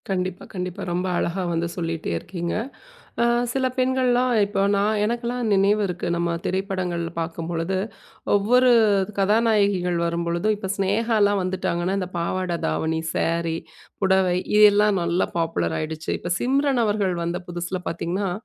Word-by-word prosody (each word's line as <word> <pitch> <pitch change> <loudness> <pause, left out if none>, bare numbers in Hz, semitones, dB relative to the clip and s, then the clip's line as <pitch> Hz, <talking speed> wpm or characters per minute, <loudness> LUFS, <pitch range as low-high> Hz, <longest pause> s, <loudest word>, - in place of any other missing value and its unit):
கண்டிப்பா, 185 -1 -2
கண்டிப்பா. 180 -2 -4
ரொம்ப 180 +2 -1
அழகா 185 +2 -1
வந்து 170 +1 0
சொல்லீட்டே 165 - -3
இருக்கீங்க. 170 - -4 0.7
அ - - +4 0.3
சில 265 +1 0
பெண்கள்லாம் 255 -1 +2
இப்ப 200 0 -2 0.2
நா 200 - +2 0.2
எனக்கெல்லாம் 235 +1 -2
நினைவு 200 +2 +3
இருக்கு. 180 -1 -4
நம்ம 170 0 0
திரைப்படங்கள் 185 -2 -2 0.2
பார்க்கும்பொழுது, 165 +2 -2 0.6
ஒவ்வொரு 245 +5 +4 0.5
கதாநாயகிகள் 200 -3 +2
வரும்பொழுது, 170 +2 -1
இப்ப 205 -2 -6
சினேகாலாம் 205 0 +2
வந்துட்டாங்கன்னா, 185 0 -1
இந்த 185 -2 -4
பாவாடை 175 +1 -1
தாவணி, 160 - -1 0.2
சேரி, 165 -1 0 0.5
புடவை 190 -1 +3 0.2
இதெல்லாம் 210 -1 +5
நல்லா 170 +1 +1
பாப்புலர் 125 - -1
ஆயிடுச்சு. 160 +1 -5
இப்ப 175 - -4
சிம்ரன் 270 0 +2
அவர்கள் 205 -3 0
வந்த 170 +1 -2
புதுசுல 175 +1 -3
பார்த்தீங்கன்னா, 180 +4 -2
185 Hz, 125 wpm, -23 LUFS, 170-210 Hz, 0.7 s, இதெல்லாம்